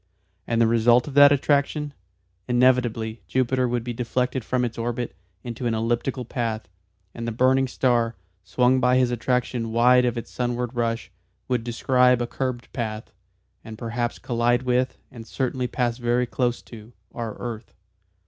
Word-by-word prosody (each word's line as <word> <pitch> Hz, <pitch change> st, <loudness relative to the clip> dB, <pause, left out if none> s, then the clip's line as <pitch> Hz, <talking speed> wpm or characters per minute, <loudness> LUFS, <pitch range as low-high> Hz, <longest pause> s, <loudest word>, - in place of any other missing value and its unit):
And 115 Hz, -1 st, 0 dB
the 115 Hz, -, +5 dB
result 115 Hz, +2 st, +4 dB
of 145 Hz, -, -6 dB
that 145 Hz, 0 st, +8 dB
attraction? 145 Hz, +1 st, +1 dB, 0.5 s
Inevitably 120 Hz, -3 st, +2 dB
Jupiter 130 Hz, 0 st, +1 dB
would 120 Hz, -1 st, -1 dB
be 120 Hz, 0 st, -4 dB
deflected 125 Hz, +2 st, -1 dB
from 125 Hz, +2 st, 0 dB
its 115 Hz, -, -5 dB
orbit 120 Hz, +1 st, -3 dB, 0.3 s
into 120 Hz, 0 st, -4 dB
an 115 Hz, -, 0 dB
elliptical 120 Hz, +3 st, -1 dB
path, 115 Hz, -2 st, -3 dB, 0.5 s
and 115 Hz, 0 st, -5 dB
the -, -, -1 dB
burning 130 Hz, +3 st, +3 dB
star, 120 Hz, -3 st, +1 dB, 0.3 s
swung 125 Hz, +6 st, +2 dB
by 125 Hz, 0 st, +3 dB
his 125 Hz, -1 st, +2 dB
attraction 120 Hz, -1 st, -1 dB
wide 125 Hz, +2 st, +5 dB
of 120 Hz, -1 st, -1 dB
its 115 Hz, -, -6 dB
sunward 120 Hz, 0 st, -2 dB
rush, 115 Hz, -2 st, -2 dB, 0.4 s
would 125 Hz, -3 st, 0 dB
"describe 125 Hz, +2 st, +3 dB
a 120 Hz, -, 0 dB
curved 125 Hz, 0 st, -4 dB
path" 110 Hz, -3 st, -4 dB, 0.5 s
and 110 Hz, -1 st, -9 dB
perhaps 120 Hz, +1 st, -3 dB
collide 120 Hz, 0 st, 0 dB
with, 125 Hz, 0 st, 0 dB
and 115 Hz, -2 st, -11 dB
certainly 130 Hz, +1 st, -2 dB
pass 120 Hz, -1 st, -1 dB
very 120 Hz, +1 st, +1 dB
close 120 Hz, 0 st, -1 dB
to, 115 Hz, 0 st, -13 dB, 0.2 s
our 115 Hz, -3 st, -5 dB
earth. 115 Hz, -2 st, -7 dB
120 Hz, 160 wpm, -24 LUFS, 115-125 Hz, 0.5 s, that